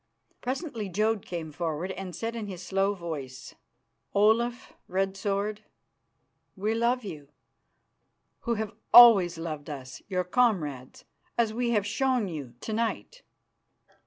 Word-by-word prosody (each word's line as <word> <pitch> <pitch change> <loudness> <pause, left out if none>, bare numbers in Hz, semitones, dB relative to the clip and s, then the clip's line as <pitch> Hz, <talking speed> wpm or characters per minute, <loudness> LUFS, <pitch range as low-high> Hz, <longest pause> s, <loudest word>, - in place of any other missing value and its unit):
Presently 250 - -3
Jodd 215 +2 0
came 165 -3 -5
forward 165 +3 -3
and 190 -2 -6
said 230 +5 -4
in 220 -3 -4
his 180 -2 -7
slow 195 +2 +1
voice: 145 -8 -7 0.6
"Olaf 230 +4 +2
Red 195 +1 -1
Sword, 200 +2 -2 0.9
we 210 +3 -1
love 235 +2 +1
you, 150 -8 -8 1.1
who 235 -1 -1
have 220 -1 -3 0.2
always 200 -8 +9
loved 155 -3 -5
us, 130 -3 -8
your 185 -2 0
comrades, 175 - 0 0.3
as 230 -2 +2
we 240 +1 0
have 210 -4 +2
shown 250 +1 +1
you 145 -8 -7
to 220 - -4
night. 230 - -2
200 Hz, 130 wpm, -28 LUFS, 170-230 Hz, 1.1 s, always